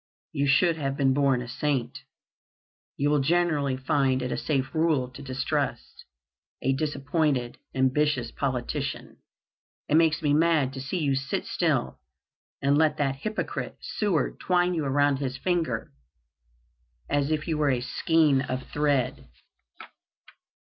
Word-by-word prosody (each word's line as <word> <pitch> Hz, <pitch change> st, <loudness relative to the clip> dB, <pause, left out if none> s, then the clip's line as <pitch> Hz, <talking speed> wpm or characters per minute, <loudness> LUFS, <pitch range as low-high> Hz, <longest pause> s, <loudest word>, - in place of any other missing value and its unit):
You 140 Hz, 0 st, 0 dB
should 165 Hz, +4 st, +3 dB
have 135 Hz, -2 st, -2 dB
been 135 Hz, -2 st, +3 dB
born 135 Hz, -3 st, +2 dB
a -, -, -9 dB
saint. 130 Hz, 0 st, -2 dB, 1.0 s
You 145 Hz, +1 st, +1 dB
will 150 Hz, -, +3 dB
generally 150 Hz, -3 st, +1 dB
find 130 Hz, -1 st, +1 dB
it 125 Hz, -, -3 dB
a -, -, 0 dB
safe 135 Hz, -4 st, -1 dB
rule 155 Hz, -6 st, +1 dB
to 125 Hz, -, -11 dB
distrust 130 Hz, -1 st, -3 dB, 0.5 s
a 135 Hz, -, +1 dB
disappointed, 145 Hz, -2 st, -1 dB, 0.2 s
ambitious 130 Hz, -1 st, +1 dB
politician. 130 Hz, -3 st, -3 dB, 0.7 s
It -, -, -2 dB
makes 165 Hz, 0 st, +3 dB
me 145 Hz, -1 st, +3 dB
mad 155 Hz, -4 st, +3 dB
to 135 Hz, -, -6 dB
see 135 Hz, +8 st, -3 dB
you 145 Hz, -5 st, +1 dB
sit 135 Hz, +1 st, -2 dB
still -, -, 0 dB, 0.6 s
and 140 Hz, +1 st, +3 dB
let 155 Hz, -1 st, +3 dB
that 135 Hz, -2 st, 0 dB
hypocrite, 215 Hz, +9 st, -4 dB
Seward, 200 Hz, -8 st, -1 dB
twine 180 Hz, 0 st, +2 dB
you 160 Hz, -4 st, -1 dB
around 145 Hz, 0 st, +2 dB
his 135 Hz, -2 st, -3 dB
finger 165 Hz, -7 st, -1 dB, 1.2 s
as 145 Hz, 0 st, 0 dB
if 155 Hz, 0 st, -1 dB
you 160 Hz, -2 st, -1 dB
were 150 Hz, -1 st, +3 dB
a 125 Hz, -2 st, +1 dB
skein 145 Hz, +2 st, +2 dB
of 130 Hz, -1 st, -4 dB
thread." 145 Hz, -4 st, 0 dB
140 Hz, 140 wpm, -26 LUFS, 130-155 Hz, 1.2 s, should